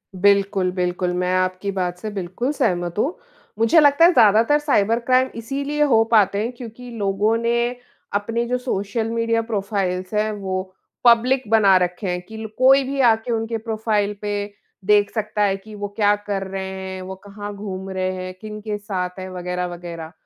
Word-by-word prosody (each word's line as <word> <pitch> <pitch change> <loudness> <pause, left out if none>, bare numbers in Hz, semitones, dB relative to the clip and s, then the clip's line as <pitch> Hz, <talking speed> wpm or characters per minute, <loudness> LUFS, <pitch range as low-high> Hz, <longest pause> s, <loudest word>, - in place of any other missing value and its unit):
बिल्कुल, 195 -1 +2
बिल्कुल, 180 0 -1
मैं 180 0 0
आपकी 185 +2 -1
बात 180 -2 -2
से 215 - -5
बिल्कुल 200 +7 -3
सहमत 175 - 0
हूँ। 305 - 0 0.4
मुझे 230 +9 +5
लगता 290 +3 +6
है, 355 - +7
ज़्यादातर 225 +5 +5
साइबर 230 -6 +2
क्राइम 255 +2 +2
इसीलिए 280 +5 -3
हो 230 -6 +4
पाते 205 -2 +4
हैं 230 - -2
क्योंकि 245 0 -10
लोगों 205 +2 +1
ने 235 +1 0 0.4
अपने 230 +3 -1
जो 250 - 0
सोशल 225 -2 -2
मीडिया 230 0 +1
प्रोफ़ाइल्स 195 -4 -2
हैं, 215 +1 +1
वो 190 -2 -4 0.3
पब्लिक 250 +3 +5
बना 205 -4 +5
रखे 180 +2 -1
हैं 180 0 -2
कि 220 0 -9
ल 220 0 -5
कोई 270 +2 +6
भी 275 +1 -4
आ 235 -3 +6
के 225 +2 -6
उनके 225 0 -1
प्रोफ़ाइल 215 -2 -1
पे 205 -1 -2 0.4
देख 205 0 +4
सकता 215 -1 -2
है 195 -1 +2
कि 215 +2 -14
वो 205 0 -4
क्या 205 -1 +4
कर 195 -1 -1
रहे 195 0 -4
हैं, 190 0 -6
वो 190 +1 -7
कहाँ 205 0 -7
घूम 195 -2 -6
रहे 185 -1 -1
हैं, 185 0 -6
किनके 215 0 -5
साथ 190 -3 -4
हैं, 185 - -6
वगैरह-वगैरह। 175 -2 -5
205 Hz, 180 wpm, -21 LUFS, 190-230 Hz, 0.4 s, है